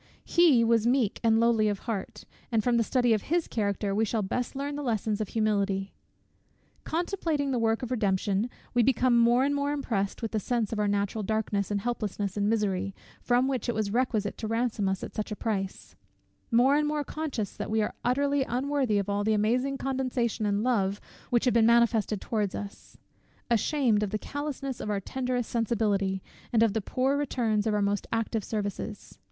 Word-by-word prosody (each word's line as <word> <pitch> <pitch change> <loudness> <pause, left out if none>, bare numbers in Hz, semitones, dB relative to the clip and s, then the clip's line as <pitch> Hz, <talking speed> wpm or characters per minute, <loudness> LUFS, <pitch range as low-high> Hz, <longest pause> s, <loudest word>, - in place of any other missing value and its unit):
He 320 -9 +5
was 230 0 +3
meek 245 -4 +2
and 225 -1 +4
lowly 230 -2 +3
of 205 -1 0
heart, 215 -5 -5 0.3
and 225 -2 +2
from 240 0 +2
the 230 - +3
study 245 0 +2
of 215 - +1
his 340 - 0
character 200 -2 -1
we 215 +3 +2
shall 220 0 0
best 245 +7 -2
learn 285 +1 -3
the 290 - -4
lessons 220 -4 -1
of 215 - -2
humility. 200 -3 0 0.9
Contemplating 325 -4 -1
the 250 - 0
work 225 +1 +1
of 250 - -4
Redemption, 200 -1 0 0.2
we 245 - +4
become 255 0 +3
more 235 +2 +5
and 285 +1 +1
more 285 0 0
impressed 230 -8 -2
with 225 - -2
the 220 - 0
sense 230 0 -1
of 215 - -2
our 210 - +2
natural 205 +1 -1
darkness, 205 -1 -1
and 205 -1 -1
helplessness, 205 -4 -2
and 205 0 +1
misery, 195 -3 0 0.3
from 245 +1 +2
which 260 -2 -2
it 240 - 0
was 215 -2 -1
requisite 230 -5 0
to 220 - -3
ransom 225 -3 0
us 190 -1 -2
at - - -6
such 215 0 -4
a - - -2
price; 195 -4 -4 0.5
more 250 +4 +4
and 300 0 +2
more 300 0 -1
conscious 280 -9 -4
that - - -5
we 220 0 +2
are - - -3
utterly 280 +3 +2
unworthy 265 -2 0
of 200 -1 -1
all 205 0 0
the 220 +1 +2
amazing 250 +6 +1
condescension 255 -5 -1
and 205 +1 0
love 205 -5 +1 0.3
which 240 0 +2
have 250 - +3
been 225 -1 +5
manifested 235 -3 +3
towards 210 -3 -2
us; 205 -1 -8 0.5
ashamed 235 -1 +2
of 210 - 0
the 215 - -1
callousness 275 +1 -5
of - - -4
our 205 -1 0
tenderest 250 +3 -3
sensibility, 205 -4 0 0.3
and 225 -1 +4
of 225 -3 +2
the 220 - 0
poor 260 +7 0
returns 235 -7 0
of 215 - +1
our 205 - +1
most 200 0 -1
active 225 -1 -1
services. 210 0 -5
225 Hz, 195 wpm, -28 LUFS, 205-255 Hz, 0.9 s, He